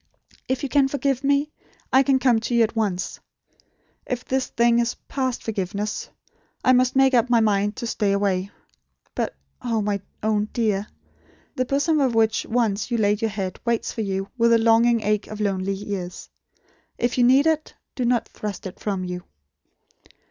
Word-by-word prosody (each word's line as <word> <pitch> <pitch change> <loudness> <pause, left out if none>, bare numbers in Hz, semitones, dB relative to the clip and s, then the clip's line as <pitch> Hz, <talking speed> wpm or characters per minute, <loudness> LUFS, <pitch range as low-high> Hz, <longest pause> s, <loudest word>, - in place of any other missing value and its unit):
If 260 +2 -1
you - - 0
can 280 -1 +4
forgive 275 -1 -1
me, 285 +2 +2 0.4
I 265 - +7
can 275 0 +3
come 250 -3 +3
to 235 +2 -2
you 235 - +5
at 225 +1 -1
once. 195 -5 -2 0.9
If 250 -1 -3
this 265 0 0
thing 235 0 +3
is 235 0 0
past 260 -3 -2
forgiveness, 205 0 -3 0.6
I 255 - +6
must 255 0 +3
make 270 0 +4
up 245 0 +3
my 240 -1 +5
mind 205 -1 +1
to 240 - -5
stay 210 -3 0
away. 200 -1 0 0.6
But, - - -2 0.3
oh, 230 -3 -1
my 200 -1 -1 0.2
own 215 -1 +1
Dear, 210 -3 0 0.7
the 255 - 0
bosom 285 +4 +1
on 260 -3 +2
which 220 -1 +2
once 225 -3 0
you 240 - 0
laid 210 0 +1
your 225 - +1
head 195 -3 -4
waits 235 -1 0
for 225 - -4
you 195 -1 -2
with 235 0 +5
the 230 - +6
longing 230 +1 +4
ache 210 0 0
of 215 - -8
lonely 195 -2 0
years. 190 -3 -6 0.7
If 240 +1 0
you - - +5
need 265 +4 +5
it, 315 -1 0 0.2
do 255 - -3
not 240 -1 +1
thrust 210 -2 -6
it 185 - -7
from 195 -3 -2
you." 180 0 -5
225 Hz, 180 wpm, -23 LUFS, 205-250 Hz, 0.9 s, I